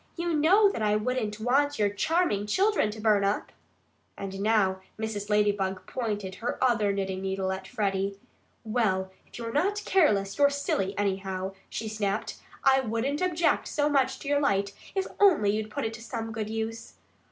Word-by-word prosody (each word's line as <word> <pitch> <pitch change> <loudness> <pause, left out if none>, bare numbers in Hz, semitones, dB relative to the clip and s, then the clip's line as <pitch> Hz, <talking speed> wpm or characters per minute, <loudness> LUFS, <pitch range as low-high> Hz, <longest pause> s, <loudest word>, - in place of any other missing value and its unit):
You 340 -1 -1
know 360 +8 +5
that 230 - -5
I 210 -1 +2
wouldn't 215 -1 -1
want 280 +5 +2
your 210 - +3
charming 210 - 0
children 390 - +2
to 215 +1 -7
burn 210 -2 +3
up." 200 +1 -1 0.7
And 195 -1 -6
now 200 -3 +2 0.2
Mrs. 215 -2 -4
Ladybug 200 -3 +1
pointed 210 -6 -3
her 235 - -2
other 230 -5 +2
knitting 190 -1 -2
needle 190 0 -1
at 190 0 -5
Freddie. 195 -1 -1 0.5
"Well, 210 -5 0 0.2
if - - -12
you're 230 -1 -5
not 400 +8 +1
careless, 205 - +2
you're 285 0 +6
silly, 205 -9 -1
anyhow," 190 -1 -2 0.2
she 225 - -4
snapped. 210 -2 -2 0.3
"I 270 -1 +5
wouldn't 260 +5 -1
object 345 -2 +1
so 295 0 +1
much 265 -2 +2
to - - -8
your 285 0 +3
light 200 -7 +1 0.2
if 385 -1 0
only 335 - +5
you'd 215 0 -3
put 215 - -3
it 225 - -2
to 225 - -9
some 225 0 -5
good 215 -1 -4
use. 225 +1 -4
220 Hz, 175 wpm, -28 LUFS, 200-270 Hz, 0.7 s, you're